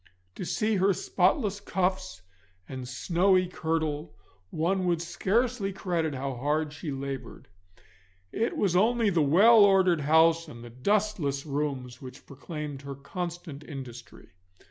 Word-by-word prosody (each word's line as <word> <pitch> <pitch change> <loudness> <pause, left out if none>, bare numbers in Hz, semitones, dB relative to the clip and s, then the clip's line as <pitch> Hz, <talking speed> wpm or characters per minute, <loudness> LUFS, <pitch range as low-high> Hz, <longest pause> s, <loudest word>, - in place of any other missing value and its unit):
To 180 - -6
see 215 +2 0
her 195 +1 +3
spotless 200 - +1
cuffs 185 - -2 0.4
and 130 -2 -7
snowy 185 +8 +2
kirtle 160 - -3 0.3
one 180 - 0
would 170 -2 +1
scarce 225 +8 0
credit 170 -6 -1
how 135 +1 -3
hard 150 +4 -1
she 150 +2 -7
laboured. 135 0 -6 0.8
It 230 - -1
was 190 -4 +1
only 225 +2 +3
the 170 -3 +2
well 205 +10 +6
ordered 190 -5 +4
house 160 +3 +4
and 120 -5 -11
the 120 - -10
dustless 150 - 0
rooms 135 -4 -3
which 130 +1 -11
proclaimed 145 0 -7
her 140 -1 -7
constant 165 0 -6
industry. 135 -5 -10
165 Hz, 130 wpm, -28 LUFS, 140-190 Hz, 0.8 s, well